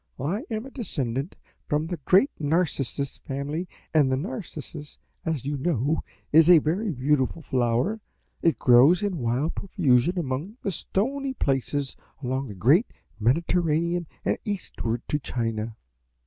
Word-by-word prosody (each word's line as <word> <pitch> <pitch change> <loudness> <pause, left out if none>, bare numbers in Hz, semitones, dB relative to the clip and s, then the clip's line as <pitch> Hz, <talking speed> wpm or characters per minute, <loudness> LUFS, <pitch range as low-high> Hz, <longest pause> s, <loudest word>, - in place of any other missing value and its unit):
I 170 - -1
am 220 +1 -3
a 270 - -10
descendant 140 - -3 0.3
from 150 0 +1
the 175 +1 -4
great 195 +10 +5
Narcissus 145 -3 0
family, 145 +6 -4 0.3
and 145 -4 +4
the 130 - +2
Narcissus, 155 - -6 0.3
as 160 -6 -2
you 145 0 -1
know, 145 0 0 0.3
is 160 +2 +7
a 175 - +10
very 175 +8 0
beautiful 145 +1 0
flower; 125 - +1 0.4
it 165 - +3
grows 130 +10 +6
in 195 -5 -1
wild 125 +7 0
profusion 175 - +2
among 160 - -3
the 200 - 0
stony 265 - -2
places 135 - -1 0.3
along 130 +2 -1
the 105 - -8
great 140 - +4 0.3
Mediterranean 170 +6 +1 0.2
and - - +1
eastward 120 - -3
to 150 - 0
China. 115 -4 -3
150 Hz, 135 wpm, -26 LUFS, 130-180 Hz, 0.4 s, a